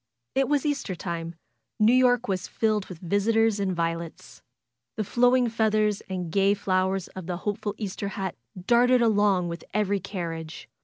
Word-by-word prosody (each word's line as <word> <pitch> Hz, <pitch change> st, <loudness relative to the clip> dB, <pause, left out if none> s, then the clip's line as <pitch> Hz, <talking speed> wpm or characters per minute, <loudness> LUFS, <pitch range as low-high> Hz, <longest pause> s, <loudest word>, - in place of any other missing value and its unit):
It 270 Hz, 0 st, +1 dB
was 290 Hz, -1 st, +1 dB
Easter 280 Hz, -10 st, -1 dB
time. 170 Hz, -1 st, -5 dB, 0.4 s
New 215 Hz, +3 st, +5 dB
York 250 Hz, -1 st, +4 dB
was 185 Hz, -2 st, -2 dB
filled 215 Hz, -3 st, 0 dB
with 180 Hz, -, -9 dB
vis 195 Hz, +5 st, -1 dB
itors 225 Hz, -2 st, +3 dB
and 190 Hz, -2 st, -1 dB
violets. 165 Hz, 0 st, -4 dB, 0.6 s
The 215 Hz, -, 0 dB
flowing 245 Hz, +3 st, +3 dB
feathers 215 Hz, -2 st, +1 dB
and 180 Hz, -3 st, -4 dB
gay 195 Hz, +2 st, +3 dB
flow 190 Hz, -1 st, +1 dB
ers 195 Hz, -2 st, -3 dB
of 185 Hz, -2 st, -9 dB
the 180 Hz, -1 st, -2 dB
hopeful 205 Hz, +2 st, -3 dB
Easter 200 Hz, -1 st, -4 dB
hat 190 Hz, -1 st, -4 dB, 0.3 s
darted 245 Hz, +2 st, +4 dB
along 205 Hz, -5 st, +3 dB
with 170 Hz, 0 st, -6 dB
every 205 Hz, -1 st, +1 dB
carriage. 165 Hz, -4 st, -6 dB
200 Hz, 165 wpm, -26 LUFS, 180-225 Hz, 0.6 s, New